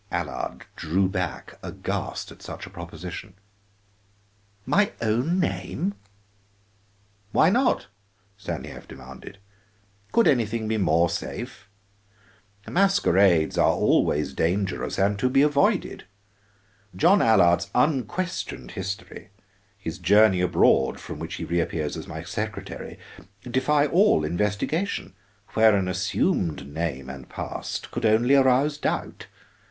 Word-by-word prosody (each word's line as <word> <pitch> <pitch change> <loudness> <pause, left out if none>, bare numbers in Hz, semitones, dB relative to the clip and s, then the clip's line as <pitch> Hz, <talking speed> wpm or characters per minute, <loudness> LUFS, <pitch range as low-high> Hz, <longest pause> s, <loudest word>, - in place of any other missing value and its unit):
Allard - - -4
drew 95 +5 0
back 90 -2 -4
aghast - - -4
at - - -15
such - - -8
a 95 - -13
proposition. 85 0 -8 1.3
"My 205 - +2
own 120 +11 +1
name 190 +1 -2 0.7
" 100 0 -38
"Why 165 - +5
not?" 255 +5 +2 0.5
Stanief 100 -1 -7
demanded. 65 +8 -11 0.7
"Could 230 - +4
anything 115 -4 +1
be 110 0 0
more 85 -2 +3
safe? 85 +4 -6 1.0
Masquerades 100 - +3
are - - +5
always 75 0 +1
dangerous 95 +3 -1
and 100 +1 +1
to 125 - +2
be 135 +2 +4
avoided. 145 -1 +1 0.9
John 185 - +4
Allard's 90 -5 +4
unquestioned 155 +7 -1
history, 95 0 -6 0.5
his 85 -5 -6
journey 95 +1 +5
abroad 80 -6 +3
from - - -8
which 80 +1 -5
he - - -5
reappears 85 -3 -1
as - - -7
my - - -7
secretary, - - -6 0.5
defy 140 +4 +2
all 165 - +3
investigation, 105 - -1 0.4
where 110 -1 +5
an 95 -2 0
assumed 90 - 0
name 70 -3 -4
and 65 -1 -9
past - - -5
could - - -4
only 115 +5 +3
arouse 135 +2 +3
doubt. - - -3
100 Hz, 115 wpm, -25 LUFS, 85-135 Hz, 1.3 s, Why